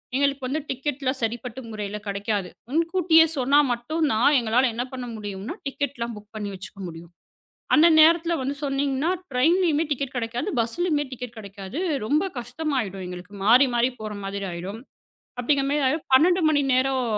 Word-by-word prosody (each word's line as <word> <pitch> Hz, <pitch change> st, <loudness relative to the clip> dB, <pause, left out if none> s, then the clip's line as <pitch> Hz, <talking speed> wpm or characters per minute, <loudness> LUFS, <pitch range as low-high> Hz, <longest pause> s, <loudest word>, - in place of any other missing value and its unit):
எங்களுக்குப் 280 Hz, +1 st, 0 dB
டிக்கெட் 270 Hz, +1 st, -3 dB
எல்லாம் 260 Hz, +1 st, 0 dB
சரிப்பட்ட 240 Hz, +2 st, -3 dB
முறையில 210 Hz, -1 st, -4 dB
கெடைக்காது. 200 Hz, -1 st, -2 dB, 0.2 s
முன்கூட்டியே 330 Hz, +1 st, +4 dB
சொன்னா 275 Hz, +3 st, +4 dB
மட்டும் 300 Hz, +7 st, -1 dB
தான், 225 Hz, +6 st, +4 dB
எங்களால 240 Hz, +3 st, +2 dB
என்ன 240 Hz, +2 st, -2 dB
பண்ண 255 Hz, -1 st, -5 dB
முடியும்னா? 205 Hz, -, -6 dB
டிக்கெட் 280 Hz, 0 st, -3 dB
எல்லாம் 235 Hz, 0 st, -3 dB
புக் 210 Hz, +1 st, -14 dB
பண்ணி 210 Hz, -1 st, -4 dB
வச்சுக்க 195 Hz, +1 st, -10 dB
முடியும். 165 Hz, +1 st, -10 dB, 0.6 s
அந்த 315 Hz, +2 st, +7 dB
நேரத்துல 330 Hz, +2 st, +5 dB
வந்து 275 Hz, +2 st, -2 dB
சொன்னீங்கன்னா, 275 Hz, +3 st, 0 dB, 0.2 s
டிரைன்லயுமே 320 Hz, +4 st, +3 dB
டிக்கெட் 275 Hz, -1 st, -2 dB
கெடைக்காது. 240 Hz, -, -2 dB
பஸ்லயுமே 295 Hz, +6 st, 0 dB
டிக்கெட் 250 Hz, -1 st, -7 dB
கெடைக்காது. 200 Hz, -, -7 dB, 0.3 s
ரொம்ப 300 Hz, -, +1 dB
கஷ்டமாயிடும் 245 Hz, -, -3 dB
எங்களுக்கு. 180 Hz, +3 st, -9 dB
மாறி 250 Hz, +6 st, +7 dB
மாறிப் 245 Hz, +1 st, +1 dB
போற 215 Hz, -1 st, -5 dB
மாதிரி 195 Hz, 0 st, -4 dB
ஆயிடும். 190 Hz, +6 st, -6 dB, 0.6 s
அப்டிங்கிற 275 Hz, +2 st, +1 dB
மாதிரி 290 Hz, -1 st, +1 dB
ஆயிடும், 300 Hz, +4 st, -1 dB
12 350 Hz, +5 st, +4 dB
மணி 290 Hz, -2 st, +2 dB
நேரம் 260 Hz, 0 st, +2 dB
255 Hz, 155 wpm, -24 LUFS, 215-290 Hz, 0.6 s, அந்த